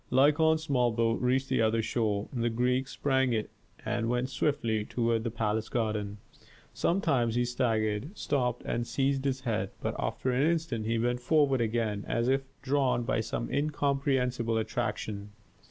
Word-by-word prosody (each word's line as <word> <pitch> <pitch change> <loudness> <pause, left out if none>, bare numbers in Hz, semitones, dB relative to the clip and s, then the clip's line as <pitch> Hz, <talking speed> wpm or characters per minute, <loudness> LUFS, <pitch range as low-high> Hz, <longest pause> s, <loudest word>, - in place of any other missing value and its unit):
Lykon's 155 +4 +4
small 125 -6 +2
boat 115 0 +1
reached 130 +2 +1
the 130 -3 +1
other 110 0 +2
shore. 105 -3 0
The 120 -2 0
Greek 125 +3 +1
sprang 130 -1 +1
from - - +1
it 110 - -4 0.3
and 120 -1 -1
went 125 +2 0
swiftly 115 -6 0
toward 115 0 0
the 115 - -1
palace 110 -1 -1
garden. 105 -3 -2 0.6
Sometimes 140 - +1
he 120 0 +2
staggered, 120 - -1
stopped, 125 -4 -1
and 120 0 -2
seized 135 0 0
his 135 -1 0
head, 110 -6 -1
but - - -2
after 130 - -1
an 135 +5 +3
instant 160 -10 -1
he 115 0 +1
went 120 +2 0
forward 135 -1 +3
again, 110 -2 -1
as 120 +1 0
if 135 +1 +3 0.2
drawn 135 -3 +1
by 115 - 0
some 115 +1 -3
incomprehensible 135 -5 0
attraction. 105 -2 -3
120 Hz, 160 wpm, -29 LUFS, 115-135 Hz, 0.6 s, Lykon's